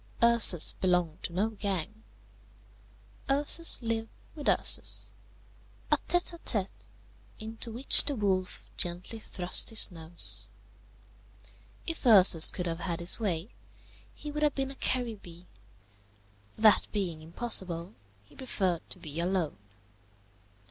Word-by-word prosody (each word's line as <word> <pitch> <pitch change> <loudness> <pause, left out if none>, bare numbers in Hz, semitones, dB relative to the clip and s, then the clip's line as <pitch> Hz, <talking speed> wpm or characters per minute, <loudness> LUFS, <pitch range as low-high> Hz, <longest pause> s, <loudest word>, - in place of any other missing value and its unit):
Ursus 235 -8 +6
belonged 180 -4 -3
to - - -6
no 200 +5 -2
gang. 205 0 -6 1.3
Ursus 290 +1 +1
lived 225 -1 -4 0.2
with 295 -2 -4
Ursus, - - +1 0.8
a - - +3
tête 350 0 0
à 340 - -13
tête, 200 -10 -3 0.5
into 225 +2 -5
which 245 +5 +8
the 285 -1 -1
wolf 190 -4 -4
gently 175 +6 -3
thrust 180 -4 -1
his 220 -3 +2
nose. 165 0 +1 1.4
If 330 -2 -6
Ursus 190 - +6
could 180 - -5
have 165 -1 -6
had 170 -2 -6
his 170 +5 +3
way, 190 -2 -5 0.6
he 300 - -10
would 300 +1 -7
have 300 -2 0
been 270 -1 -4
a - - -12
Caribbee; 215 -11 -6 1.1
that 215 -2 +2
being 180 -7 -5
impossible, 175 0 -2 0.3
he 100 - -24
preferred 185 -9 -4
to - - -8
be 160 -3 -9
alone. 175 - -4
195 Hz, 120 wpm, -27 LUFS, 175-235 Hz, 1.4 s, which